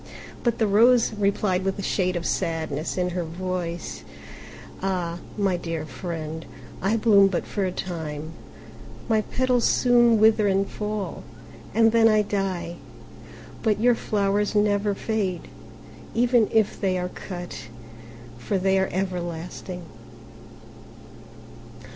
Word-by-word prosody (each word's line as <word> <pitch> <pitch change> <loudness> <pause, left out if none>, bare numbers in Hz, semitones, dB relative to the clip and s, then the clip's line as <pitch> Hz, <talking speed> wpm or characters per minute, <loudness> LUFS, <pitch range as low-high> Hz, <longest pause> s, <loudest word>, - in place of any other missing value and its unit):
But 235 -2 +1
the 220 - +2
Rose 230 +3 +4
replied 200 -2 +1
with 195 +1 -1
a 200 - -4
shade 185 -2 0
of 170 -1 -3
sadness 160 -1 -2
in 180 0 +1
her 175 0 -2
voice, 175 0 -4 0.8
"Ah, 180 -3 -2 0.2
my 195 -3 +1
dear 165 -2 -4
friend, 160 +2 -5 0.4
I 205 +4 +2
bloom 210 -3 +6
but 185 -3 -2
for 200 -2 -2
a 185 - -1
time: 160 -4 -5 0.8
my 220 -1 +3
petals 250 +1 +1
soon 240 -2 +4
wither 215 -1 +5
and 195 0 +2
fall, 210 -4 -4 0.5
and 225 0 +5
then 225 0 +5
I 215 -1 +4
die. 190 -4 -2 0.8
But 215 -2 +1
your 245 +2 +5
flowers 205 -1 0
never 205 -1 +2
fade, 195 -5 -2 0.7
even 240 -2 +3
if 220 -3 +1
they 190 -2 +1
are 180 0 -2
cut; 175 - -7 0.7
for 195 - -1
they 190 +1 +2
are 190 - 0
everlasting." 180 -1 -4
195 Hz, 125 wpm, -25 LUFS, 175-215 Hz, 0.8 s, bloom